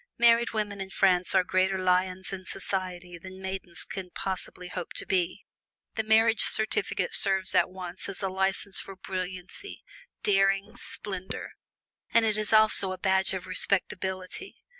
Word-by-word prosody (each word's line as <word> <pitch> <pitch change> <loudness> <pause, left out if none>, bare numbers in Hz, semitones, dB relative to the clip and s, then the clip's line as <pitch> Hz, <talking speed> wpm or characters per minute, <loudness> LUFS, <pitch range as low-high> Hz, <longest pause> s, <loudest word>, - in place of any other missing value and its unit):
Married 235 0 +5
women 205 -2 -3
in 190 - -5
France 185 -1 +3
are 185 - +5
greater 185 +1 +1
lions 185 +1 0
in 190 -1 -5
society 180 -3 -4
than 185 +1 -10
maidens 190 -2 -2
can 190 -2 -6
possibly 185 0 -5
hope 180 -1 -6
to - - -3
be. 185 +1 -1 0.5
The 220 - 0
marriage 225 +1 +4
certificate 410 - 0
serves 190 -1 +4
at - - +4
once 185 0 -7
as 195 - -6
a - - +2
license 190 +1 +1
for 195 - -7
brilliancy, 185 - -6 0.4
daring, 195 +2 +2
splendor, 190 -5 -5 0.6
and 230 -1 +4
it 215 -1 +1
is 215 -1 -2
also 215 -3 +5
a - - -6
badge 190 0 +2
of 185 - -5
respectability. 190 - -1
190 Hz, 150 wpm, -28 LUFS, 185-205 Hz, 0.6 s, Married